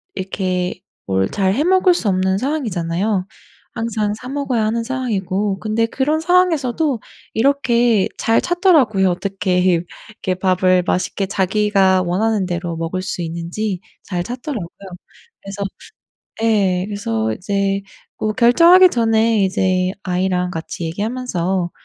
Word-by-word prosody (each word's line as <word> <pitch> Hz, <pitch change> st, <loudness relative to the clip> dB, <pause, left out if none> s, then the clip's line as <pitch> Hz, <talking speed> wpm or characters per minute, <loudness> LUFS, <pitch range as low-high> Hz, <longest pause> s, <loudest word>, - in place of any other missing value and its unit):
이렇게 185 Hz, -1 st, -2 dB, 0.3 s
뭘 95 Hz, 0 st, +1 dB
잘 190 Hz, -1 st, +1 dB
해 280 Hz, -, +1 dB
먹을 370 Hz, +1 st, +4 dB
수 240 Hz, -, -1 dB
없는 190 Hz, 0 st, +1 dB
상황이잖아요. 200 Hz, -, -1 dB, 0.5 s
항상 220 Hz, -2 st, -2 dB
사 250 Hz, +4 st, -9 dB
먹어야 270 Hz, -5 st, -1 dB
하는 230 Hz, +2 st, -1 dB
상황이고 205 Hz, -6 st, -2 dB
근데 215 Hz, +4 st, 0 dB
그런 275 Hz, +6 st, 0 dB
상황에서도 320 Hz, -6 st, +2 dB, 0.3 s
이렇게 240 Hz, -4 st, +2 dB
잘 225 Hz, -, +2 dB
찾더라고요. 300 Hz, -, +3 dB
어떻게 185 Hz, 0 st, -1 dB
이렇게 185 Hz, +2 st, -2 dB
밥을 185 Hz, -1 st, +2 dB
맛있게 190 Hz, +2 st, -1 dB
자기가 195 Hz, -1 st, +2 dB
원하는 200 Hz, +3 st, 0 dB
대로 175 Hz, -2 st, -3 dB
먹을 165 Hz, +3 st, -3 dB
수 185 Hz, -, -4 dB
있는지 175 Hz, +4 st, -4 dB, 0.2 s
잘 175 Hz, -3 st, -3 dB
찾더라고요. 240 Hz, -, -5 dB, 0.7 s
그래서 195 Hz, 0 st, -6 dB, 0.8 s
예 195 Hz, -5 st, +2 dB
그래서 115 Hz, -, -2 dB
이제 195 Hz, -, -1 dB, 0.4 s
뭐 215 Hz, -, -1 dB
결정하기 335 Hz, -, +6 dB
전에 225 Hz, -3 st, +2 dB
이제 185 Hz, -1 st, +1 dB
아이랑 180 Hz, 0 st, 0 dB
같이 165 Hz, 0 st, -6 dB
얘기하면서 190 Hz, -2 st, -2 dB
200 Hz, 290 characters per minute, -19 LUFS, 185-235 Hz, 0.8 s, 결정하기